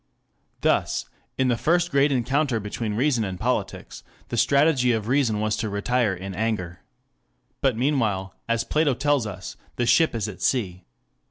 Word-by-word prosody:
Thus, - - +1 0.3
in 130 -1 +2
the 120 - +3
first 170 +4 +1
great 140 0 +3
encounter 135 0 +1
between 105 +1 -4
reason 125 -1 +2
and 95 -3 -4
politics, - - -3 0.3
the - - -3
strategy 140 -4 +3
of 110 -2 -2
reason 125 -5 +2
was 110 0 0
to 110 - -2
retire 105 +1 0
in 95 +2 -7
anger. 95 -4 -2 0.8
But 130 -5 +2
meanwhile, 110 -8 0 0.2
as 115 0 +1
Plato 150 -2 +1
tells 140 -3 +1
us, 95 -3 -8 0.2
the 120 - 0
ship 155 +3 +3
is 110 -2 -1
at 100 -4 -9
sea. 95 -8 -1
115 Hz, 160 wpm, -24 LUFS, 105-140 Hz, 0.8 s, the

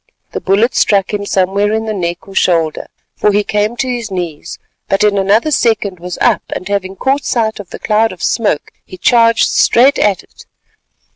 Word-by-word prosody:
The - - -5
bullet 205 +6 +2
struck 200 -1 +1
him 205 -1 -3
somewhere 195 +2 +1
in 220 +1 -1
the 220 - -3
neck 175 -2 -4
or 195 - -11
shoulder, 165 -5 0 0.3
for 210 - +1
he 205 +1 +1
came 210 +3 -1
to 260 - -1
his 240 -3 -3
knees, 175 -5 -5 0.3
but 195 +1 +1
in 210 -1 +3
another 205 +9 +2
second 210 - 0
was 180 +1 -6
up - - +2
and 185 - -6
having 195 -1 -2
caught 270 +7 0
sight 220 -3 -1
of 200 - -9
the - - -8
cloud 220 +1 +1
of 185 - -10
smoke 205 -10 -1
he 185 - -12
charged 230 +2 +3
straight 270 +5 +3
at 195 -3 +1
it. - - -19
205 Hz, 195 wpm, -14 LUFS, 190-225 Hz, 0.3 s, in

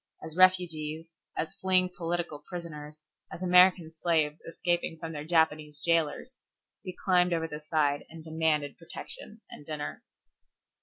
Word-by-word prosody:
As 160 0 -6
refugees, 165 -3 +2 0.3
as 160 - -2
fleeing 185 -1 +3
political 170 -3 -2
prisoners, 155 -4 -8 0.3
as 180 - -6
American 180 -2 +6
slaves 160 -2 +1
escaping 170 0 -1
from 165 0 -6
their 150 -2 -5
Japanese 155 -3 +1
jailers, 165 - 0 0.5
we 185 -2 -7
climbed 180 -2 +4
over 165 -1 0
the 150 -1 -6
side 150 -2 0
and 160 -1 -10
demanded 155 -3 0
protection 210 +5 -9
and - - -10
dinner. 150 -1 -5
165 Hz, 135 wpm, -29 LUFS, 155-175 Hz, 0.5 s, American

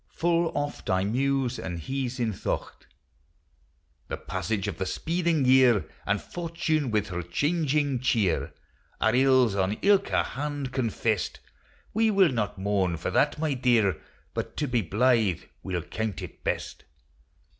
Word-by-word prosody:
Full 170 0 +2
oft 145 0 -3
I 95 0 +2
muse 130 +3 0
and 90 -2 -4
hes 130 - -3
in 115 -3 0
thocht. - - -4 1.2
The - - -4
passage 105 -4 -3
of - - -4
the 95 - -1
speeding 165 - 0
year, 125 -5 +5 0.2
And 100 - +2
Fortune 160 - -2
with 105 -2 0
her 90 -1 -3
changing 145 - 0
cheer, 115 -7 +1 0.5
Are 110 - +3
ills 130 -3 +4
on 95 0 +1
ilka 200 -1 +3
hand 145 -1 -4
confest; 115 -5 -1 0.5
We 225 +1 +3
will 195 -6 +4
not 105 -5 -2
mourn 95 -3 0
for 80 - -3
that, 145 +1 +2
my 155 -1 0
dear, 115 - +2 0.3
But - - -4
to 150 - 0
be 120 -2 +1
blythe 110 0 +2 0.2
we 95 - -4
'11 85 -1 -4
count 110 -3 -3
it - - -10
best. - - -3
125 Hz, 145 wpm, -27 LUFS, 100-145 Hz, 1.2 s, year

